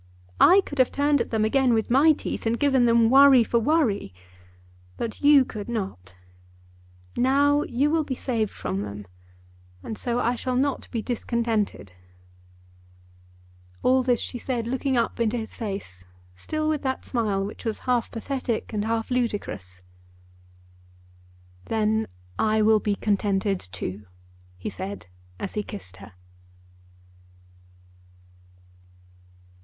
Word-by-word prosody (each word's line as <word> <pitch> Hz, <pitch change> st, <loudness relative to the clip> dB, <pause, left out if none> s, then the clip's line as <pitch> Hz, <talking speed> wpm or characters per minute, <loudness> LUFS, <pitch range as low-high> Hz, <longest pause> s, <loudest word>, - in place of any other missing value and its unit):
I 380 Hz, +3 st, +7 dB
could 285 Hz, -, -7 dB
have 255 Hz, -, +4 dB
turned 285 Hz, -1 st, +2 dB
at -, -, -3 dB
them 220 Hz, -1 st, +1 dB
again 255 Hz, +1 st, +3 dB
with 220 Hz, +1 st, -1 dB
my 285 Hz, +6 st, +6 dB
teeth, 295 Hz, -, -3 dB
and 230 Hz, +1 st, 0 dB
given 270 Hz, -4 st, +3 dB
them 230 Hz, 0 st, +4 dB
worry 270 Hz, -2 st, +7 dB
for 235 Hz, +1 st, +1 dB
worry; 230 Hz, -, +1 dB, 0.8 s
but 225 Hz, -2 st, -5 dB
you 285 Hz, -2 st, +6 dB
could 215 Hz, -2 st, -7 dB
not. 190 Hz, -, -5 dB, 1.0 s
Now 285 Hz, +3 st, +3 dB
you 280 Hz, +2 st, 0 dB
will 320 Hz, -1 st, +2 dB
be 270 Hz, -3 st, -4 dB
saved 230 Hz, -5 st, -1 dB
from 95 Hz, -, -4 dB
them, 105 Hz, 0 st, -7 dB, 0.8 s
and 220 Hz, -, -5 dB
so 240 Hz, -2 st, -1 dB
I 240 Hz, 0 st, +1 dB
shall 250 Hz, +1 st, -3 dB
not 275 Hz, +2 st, -1 dB
be 230 Hz, -3 st, -3 dB
discontented." 230 Hz, -, -2 dB, 1.9 s
All 260 Hz, +1 st, +4 dB
this 245 Hz, -2 st, +1 dB
she 245 Hz, -, -5 dB
said 240 Hz, -2 st, -3 dB
looking 260 Hz, +2 st, -1 dB
up 235 Hz, 0 st, -1 dB
into 230 Hz, +1 st, +1 dB
his 220 Hz, -1 st, -6 dB
face, 195 Hz, -, -6 dB, 0.3 s
still 310 Hz, -, -3 dB
with 310 Hz, -2 st, 0 dB
that 265 Hz, -1 st, -3 dB
smile 210 Hz, -6 st, -1 dB
which 205 Hz, -, -8 dB
was 225 Hz, -2 st, -2 dB
half 245 Hz, -3 st, +1 dB
pathetic 235 Hz, -1 st, -3 dB
and 210 Hz, 0 st, -1 dB
half 225 Hz, +1 st, -2 dB
ludicrous. 105 Hz, -, -3 dB, 1.8 s
"Then 220 Hz, 0 st, 0 dB, 0.3 s
I 215 Hz, 0 st, +2 dB
will 215 Hz, 0 st, +5 dB
be 205 Hz, -1 st, -1 dB
contented 200 Hz, -1 st, 0 dB
too," 95 Hz, +2 st, -7 dB, 0.5 s
he 90 Hz, -, -5 dB
said 195 Hz, +2 st, -6 dB, 0.3 s
as 195 Hz, -, -5 dB
he 210 Hz, -, -1 dB
kissed 190 Hz, -, -10 dB
her. 100 Hz, +1 st, -13 dB
230 Hz, 135 wpm, -25 LUFS, 205-260 Hz, 1.9 s, I